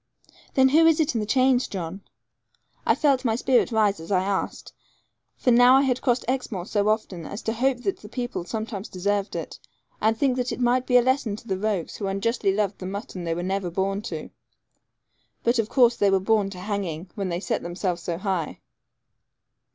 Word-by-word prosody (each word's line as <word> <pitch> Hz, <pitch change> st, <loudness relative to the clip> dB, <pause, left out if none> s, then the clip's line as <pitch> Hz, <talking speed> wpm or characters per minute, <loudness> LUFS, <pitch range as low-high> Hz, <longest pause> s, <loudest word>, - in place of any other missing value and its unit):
'Then 265 Hz, 0 st, +5 dB
who 320 Hz, +4 st, +5 dB
is 325 Hz, -1 st, +4 dB
it 310 Hz, -4 st, +2 dB
in 230 Hz, -, 0 dB
the 210 Hz, -, -3 dB
chains, 255 Hz, 0 st, +3 dB
John?' 185 Hz, 0 st, -5 dB, 0.9 s
I -, -, +5 dB
felt 275 Hz, -4 st, +2 dB
my 225 Hz, -3 st, +1 dB
spirit 250 Hz, +1 st, +2 dB
rise 210 Hz, -4 st, +2 dB
as 165 Hz, +4 st, -9 dB
I 185 Hz, -1 st, +3 dB
asked; 195 Hz, 0 st, -3 dB, 0.6 s
for 250 Hz, -, +2 dB
now 245 Hz, +2 st, +7 dB
I 270 Hz, -, +5 dB
had 255 Hz, -2 st, 0 dB
crossed 245 Hz, -2 st, +1 dB
Exmoor 245 Hz, -8 st, -2 dB
so 205 Hz, +1 st, +1 dB
often 210 Hz, -5 st, -1 dB
as 205 Hz, -, -7 dB
to 225 Hz, -, -1 dB
hope 250 Hz, +1 st, 0 dB
that 390 Hz, -, -1 dB
the 210 Hz, -, -12 dB
people 240 Hz, -6 st, -4 dB
sometimes 215 Hz, +1 st, -5 dB
deserved 200 Hz, +2 st, -1 dB
it, -, -, -6 dB, 0.4 s
and 220 Hz, +1 st, +2 dB
think 260 Hz, 0 st, +1 dB
that 250 Hz, -1 st, -1 dB
it -, -, -4 dB
might 250 Hz, +1 st, +2 dB
be 250 Hz, -, +5 dB
a 245 Hz, -, +5 dB
lesson 255 Hz, -4 st, +1 dB
to 225 Hz, -, -13 dB
the 190 Hz, -, 0 dB
rogues 195 Hz, -3 st, -2 dB
who 200 Hz, -, -3 dB
unjustly 200 Hz, +1 st, 0 dB
loved 200 Hz, 0 st, -1 dB
the 185 Hz, -, -5 dB
mutton 195 Hz, -2 st, -6 dB
they 165 Hz, -1 st, -1 dB
were 175 Hz, -, -3 dB
never 190 Hz, 0 st, -1 dB
born 195 Hz, +3 st, -1 dB
to. -, -, -6 dB, 1.1 s
But, 235 Hz, +1 st, +2 dB
of 220 Hz, -1 st, 0 dB
course, 240 Hz, -3 st, +4 dB
they 200 Hz, -, +3 dB
were 195 Hz, 0 st, +3 dB
born 205 Hz, 0 st, +1 dB
to 185 Hz, -2 st, -9 dB
hanging, 185 Hz, -4 st, -4 dB
when 195 Hz, -3 st, -3 dB
they 170 Hz, 0 st, -2 dB
set -, -, -2 dB
themselves 175 Hz, 0 st, -3 dB
so 170 Hz, 0 st, -3 dB
high. 185 Hz, -4 st, -2 dB
210 Hz, 205 wpm, -25 LUFS, 190-245 Hz, 1.1 s, now